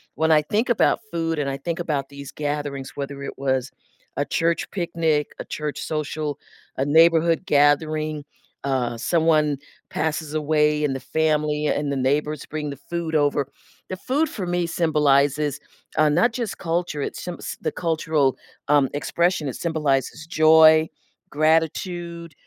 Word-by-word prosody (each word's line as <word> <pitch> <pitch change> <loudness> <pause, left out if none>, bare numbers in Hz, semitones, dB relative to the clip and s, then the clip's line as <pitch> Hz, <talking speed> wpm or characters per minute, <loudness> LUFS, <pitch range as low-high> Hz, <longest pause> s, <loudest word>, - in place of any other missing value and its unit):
when 160 +1 +2
I 155 -1 +6
think 210 +11 -1
about 240 - +3
food 165 -2 -1
and 140 -2 -1
I 135 - -3
think 170 +4 -4
about 145 -5 -2
these 140 -1 -9
gatherings, 145 -2 -4
whether 140 0 -5
it - - -7
was 130 -1 -1 0.5
a - - +1
church 165 0 0
picnic, 165 -5 0
a - - -5
church 150 -1 -4
social, 150 -1 -3 0.4
a 135 - 0
neighborhood 165 +3 +4
gathering, 155 0 +2 0.4
uh, 125 -4 -1
someone 155 0 +2 0.3
passes 155 -1 -2
away 150 0 +2
and 135 -2 -1
the - - -4
family 150 -1 0
and 145 -1 0
the - - -1
neighbors 145 +2 0
bring 150 -1 -4
the 140 - -6
food 170 -2 -3
over, 145 -2 +1 0.4
the 185 - -4
food 275 +10 0
for 195 - -5
me 175 0 0
symbolizes, 150 -3 +2 0.4
uh, 155 - +5
not 230 +11 +3
just 230 -3 -4
culture 170 -3 -2
it - - -3
symbs 180 -1 -6
the - - -1
cultural, 155 -5 +1 0.3
um, 145 -2 +4
expression, 170 +2 0
it 125 - -6
symbolizes 150 -3 -1
joy, 160 -1 +6 0.4
gratitude, 170 +2 0
155 Hz, 150 wpm, -23 LUFS, 145-165 Hz, 0.5 s, I